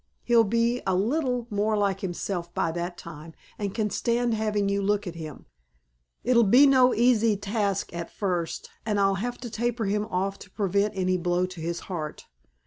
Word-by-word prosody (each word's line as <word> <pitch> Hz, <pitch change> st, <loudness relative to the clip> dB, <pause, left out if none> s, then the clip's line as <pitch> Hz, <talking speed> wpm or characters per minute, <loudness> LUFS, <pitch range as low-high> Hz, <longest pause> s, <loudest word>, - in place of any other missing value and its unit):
He'll 235 Hz, -1 st, +5 dB
be 230 Hz, +3 st, +1 dB
a 190 Hz, -, +2 dB
little 250 Hz, -, 0 dB
more 210 Hz, +1 st, +1 dB
like 200 Hz, -2 st, +1 dB
himself 175 Hz, -2 st, -4 dB
by 165 Hz, -, +1 dB
that 175 Hz, +1 st, -4 dB
time 160 Hz, 0 st, -10 dB, 0.2 s
and 200 Hz, -2 st, -2 dB
can 210 Hz, -3 st, 0 dB
stand 235 Hz, +2 st, +1 dB
having 210 Hz, -2 st, 0 dB
you 200 Hz, 0 st, 0 dB
look 205 Hz, +1 st, +1 dB
at 175 Hz, -, -5 dB
him.... 155 Hz, -4 st, -8 dB, 0.8 s
It'll 245 Hz, -1 st, +4 dB
be 245 Hz, +7 st, +7 dB
no 260 Hz, -2 st, +5 dB
easy 230 Hz, -3 st, +3 dB
task 200 Hz, -2 st, -1 dB
at 170 Hz, -1 st, -5 dB
first; 180 Hz, -5 st, -3 dB
and 210 Hz, -2 st, 0 dB
I'll 195 Hz, -1 st, +2 dB
have 245 Hz, +1 st, -3 dB
to 245 Hz, -, -5 dB
taper 240 Hz, 0 st, -1 dB
him 210 Hz, +2 st, 0 dB
off 195 Hz, -1 st, -2 dB
to 205 Hz, -, -12 dB
prevent 200 Hz, +1 st, 0 dB
any 185 Hz, 0 st, +1 dB
blow 175 Hz, +1 st, +1 dB
to 185 Hz, -2 st, -8 dB
his 170 Hz, +1 st, -3 dB
heart. 160 Hz, -5 st, -6 dB
200 Hz, 185 wpm, -26 LUFS, 180-230 Hz, 0.8 s, be